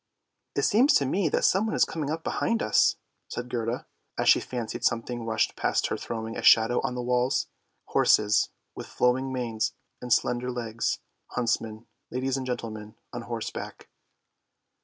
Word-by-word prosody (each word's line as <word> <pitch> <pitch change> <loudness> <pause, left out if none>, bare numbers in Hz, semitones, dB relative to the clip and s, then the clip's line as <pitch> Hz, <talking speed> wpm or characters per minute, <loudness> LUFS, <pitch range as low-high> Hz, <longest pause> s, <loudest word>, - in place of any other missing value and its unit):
" - - -54
It - - +1
seems 240 +7 +5
to 140 - +4
me 170 +5 +1
that - - +1
someone 210 +4 +2
is - - +4
coming 155 -3 -4
up 160 +1 -3
behind 230 -1 0
us," 110 - +4 0.3
said 120 0 -5
Gerda, 115 0 -2 0.3
as - - 0
she - - +7
fancied 120 -3 -5
something 115 0 -1
rushed 110 0 +1
past - - +1
her - - -1
throwing 115 -1 -5
a - - -4
shadow 115 +2 +5
on 125 - -2
the 125 - -3
walls; 125 +1 +1 0.4
horses 105 -1 +4 0.2
with - - -8
flowing 130 +2 +1
manes 120 -4 -1 0.3
and 125 - -6
slender 120 +2 +2
legs; 115 -2 -2 0.3
huntsmen, 115 -2 -1 0.2
ladies 130 +1 -1
and 130 -1 -3
gentlemen, 110 -3 -5 0.2
on 120 - -4
horseback. 115 -1 -6
120 Hz, 160 wpm, -27 LUFS, 115-130 Hz, 0.4 s, she